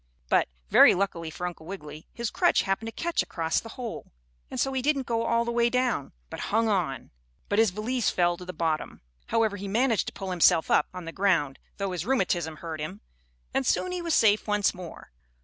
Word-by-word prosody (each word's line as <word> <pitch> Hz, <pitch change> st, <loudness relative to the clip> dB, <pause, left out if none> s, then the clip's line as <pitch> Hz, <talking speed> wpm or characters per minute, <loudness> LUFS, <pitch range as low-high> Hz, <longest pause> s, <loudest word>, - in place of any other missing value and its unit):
But, -, -, +3 dB, 0.2 s
very -, -, +8 dB
luckily 175 Hz, -4 st, -2 dB
for 180 Hz, +3 st, -5 dB
Uncle 170 Hz, -2 st, -6 dB
Wiggily, 155 Hz, -5 st, -8 dB
his 235 Hz, -3 st, -4 dB
crutch -, -, +3 dB
happened 195 Hz, +3 st, -1 dB
to -, -, -4 dB
catch 340 Hz, +7 st, -1 dB
across 165 Hz, -1 st, -1 dB
the 225 Hz, -, -10 dB
hole, 240 Hz, -3 st, -6 dB, 0.4 s
and -, -, -5 dB
so 270 Hz, -, +1 dB
he 260 Hz, -, 0 dB
didn't 275 Hz, -1 st, +1 dB
go 230 Hz, -1 st, -1 dB
all 235 Hz, 0 st, +2 dB
the 235 Hz, -, -1 dB
way 235 Hz, 0 st, +3 dB
down, 250 Hz, -, 0 dB, 0.2 s
but -, -, -6 dB
hung 225 Hz, +2 st, +2 dB
on. 175 Hz, -, -1 dB, 0.4 s
But 205 Hz, -, +2 dB
his 225 Hz, -1 st, +5 dB
valise 220 Hz, +5 st, -1 dB
fell 175 Hz, -1 st, +2 dB
to 180 Hz, -, -9 dB
the 180 Hz, -, -5 dB
bottom. 160 Hz, -2 st, -2 dB, 0.3 s
However, 220 Hz, -2 st, +1 dB
he 200 Hz, +1 st, -6 dB
managed 230 Hz, +2 st, +1 dB
to -, -, -5 dB
pull 190 Hz, -1 st, -5 dB
himself 175 Hz, -1 st, +4 dB
up -, -, +4 dB
on 180 Hz, -2 st, -8 dB
the 165 Hz, -, -5 dB
ground, 180 Hz, -8 st, +1 dB, 0.2 s
though 195 Hz, -1 st, -2 dB
his 175 Hz, -3 st, -3 dB
rheumatism 180 Hz, -9 st, 0 dB
hurt 160 Hz, -1 st, -6 dB
him, 125 Hz, -9 st, -6 dB, 0.5 s
and -, -, +1 dB
soon 365 Hz, -, +1 dB
he 360 Hz, -1 st, -3 dB
was 335 Hz, -2 st, +1 dB
safe 215 Hz, -1 st, +4 dB
once 210 Hz, -1 st, +2 dB
more. 180 Hz, -3 st, -10 dB
200 Hz, 215 wpm, -27 LUFS, 170-230 Hz, 0.5 s, very